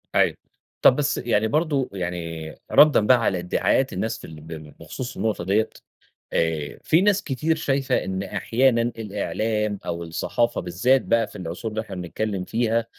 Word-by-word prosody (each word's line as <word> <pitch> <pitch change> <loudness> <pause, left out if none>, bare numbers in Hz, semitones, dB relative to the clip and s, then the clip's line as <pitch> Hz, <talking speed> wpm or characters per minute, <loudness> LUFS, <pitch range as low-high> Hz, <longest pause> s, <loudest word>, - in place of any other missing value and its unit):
أيوه، - - +4 0.5
طب 130 - +7
بس، 145 0 0
يعني 110 -2 +1
برضو 145 0 0
يعني 85 -4 -4 0.2
ردًا 150 0 +7
بقى 130 - +7
على 95 -4 +1
ادعاءات 90 +1 +1
الناس - - -2
في - - -10
ال 80 -1 -11
ب 80 - -14 0.3
بخصوص 125 -1 -6
النقطة 110 -5 -1
ديّة، 100 +4 +1 0.6
آآ 80 -3 -1
في 165 +3 +4
ناس 205 0 +3
كتير 155 +4 0
شايفة 135 -2 0
إن 95 0 -3
أحيانًا 115 +5 +2
الإعلام 105 -2 -2
أو 85 0 -3
الصحافة 115 +8 -1
بالذات 110 +10 +2
بقى 115 -1 +1
في - - -15
العصور 90 +6 -5
اللي 110 +1 -2
إحنا 100 -4 -8
بنتكلّم 95 +2 -3
فيها، 115 +1 0
110 Hz, 160 wpm, -24 LUFS, 90-125 Hz, 0.6 s, طب